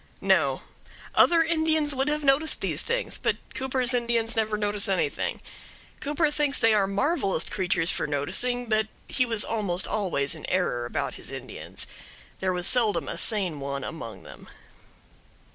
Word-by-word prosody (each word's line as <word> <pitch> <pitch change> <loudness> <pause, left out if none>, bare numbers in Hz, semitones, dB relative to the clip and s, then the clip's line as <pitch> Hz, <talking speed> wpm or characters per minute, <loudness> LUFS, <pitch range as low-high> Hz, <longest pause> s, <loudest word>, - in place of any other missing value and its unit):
No, - - +2 0.5
other 335 -1 +5
Indians 315 -2 +1
would 270 +1 0
have 300 0 0
noticed 285 +3 +3
these - - -1
things, 485 +2 -2
but - - 0 0.2
Cooper's 260 -1 0
Indians 235 -1 0
never 215 -1 +1
notice 205 -1 +1
anything. 190 - -1 0.6
Cooper 300 +1 +1
thinks 295 -2 +1
they 225 -1 +4
are 200 -2 +3
marvelous 200 - 0
creatures 180 -3 +1
for - - -2
noticing, 245 - 0
but 215 -1 +1 0.2
he 255 -2 0
was 225 -2 0
almost 200 -5 0
always 175 -10 0
in 160 - -7
error 120 -10 0
about - - -2
his - - -6
Indians. - - -6 0.5
There 190 -1 0
was 180 -1 -1
seldom 210 - +2
a - - -3
sane 180 -4 +1
one 140 -1 -4
among 120 -8 -7
them. - - -13
220 Hz, 155 wpm, -26 LUFS, 180-270 Hz, 0.6 s, other